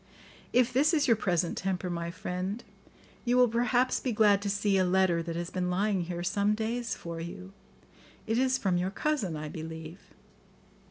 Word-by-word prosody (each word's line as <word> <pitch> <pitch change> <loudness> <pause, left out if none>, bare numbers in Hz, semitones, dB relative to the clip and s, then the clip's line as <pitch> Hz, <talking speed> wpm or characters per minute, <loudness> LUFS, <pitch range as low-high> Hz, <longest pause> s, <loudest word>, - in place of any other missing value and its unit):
"If 250 0 +3
this 295 +6 +4
is 300 - +2
your 230 - +5
present 175 -5 0
temper, 190 -1 -2
my 170 -1 -3
friend, 185 +5 -4 0.6
you 245 0 +2
will 250 0 +6
perhaps 245 +2 +1
be 255 - -2
glad 210 -2 +4
to 200 - -2
see 205 0 +1
a - - +4
letter 180 -2 +2
that 165 0 -5
has 170 +1 -4
been 180 -1 -1
lying 190 0 +1
here 175 0 -4
some 205 +3 +1
days 230 +2 -2
for 170 -1 -7
you; 185 +3 -8 0.7
it 225 +2 +1
is 260 0 +2
from 190 -6 +1
your 180 +1 0
cousin, 200 - -1
I 150 0 -5
believe." 160 +2 -7
195 Hz, 180 wpm, -29 LUFS, 175-230 Hz, 0.7 s, will